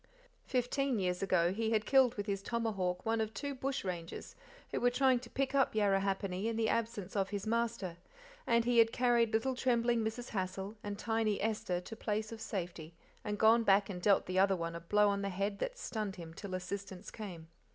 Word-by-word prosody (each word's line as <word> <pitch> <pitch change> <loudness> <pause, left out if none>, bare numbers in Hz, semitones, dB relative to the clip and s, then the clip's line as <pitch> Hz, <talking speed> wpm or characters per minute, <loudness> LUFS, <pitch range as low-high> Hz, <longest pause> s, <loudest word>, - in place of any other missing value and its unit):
Fifteen 255 +1 0
years 180 -2 -1
ago 180 -2 +2
he 220 +2 -1
had 215 -1 +1
killed 260 -3 +5
with 205 - -3
his 200 -2 -2
tomahawk 195 -6 -2
one 225 0 +1
of 220 0 -3
two 285 -1 -3
bushrangers 195 -11 -4 0.4
who - - -1
were 245 - +5
trying 260 0 +3
to 240 -1 -12
pick 275 0 -1
up 270 -5 +2
Yarrahappini 195 -1 +1
in 230 - -1
the 220 -1 +1
absence 220 -5 -2
of 195 -1 +1
his 205 0 -4
master, 225 -6 -1 0.5
and 235 -1 +3
he 240 -1 +4
had 225 0 +6
carried 240 -2 +3
little 225 +4 +1
trembling 235 -2 +2
Mrs. 225 +3 -4
Hassal 190 +1 -3
and 205 -1 -4
tiny 225 -1 0
Esther 210 -4 -1
to 225 +5 -8
place 215 0 -2
of 225 -1 -8
safety, 170 -4 -5 0.3
and 210 -1 -2
gone 225 +2 +6
back 200 -2 +3
and 180 -2 -6
dealt 200 +1 +4
the 185 +1 0
other 195 0 +4
one 165 -1 -3
a 170 - -5
blow 205 +5 +3
on 200 0 +1
the 200 - -1
head 200 +2 -2
that - - -3
stunned 215 - -3
him 165 -3 -9
till 185 +2 -6
assistance 190 +1 -6
came. 175 -7 -8
210 Hz, 205 wpm, -34 LUFS, 190-230 Hz, 0.5 s, had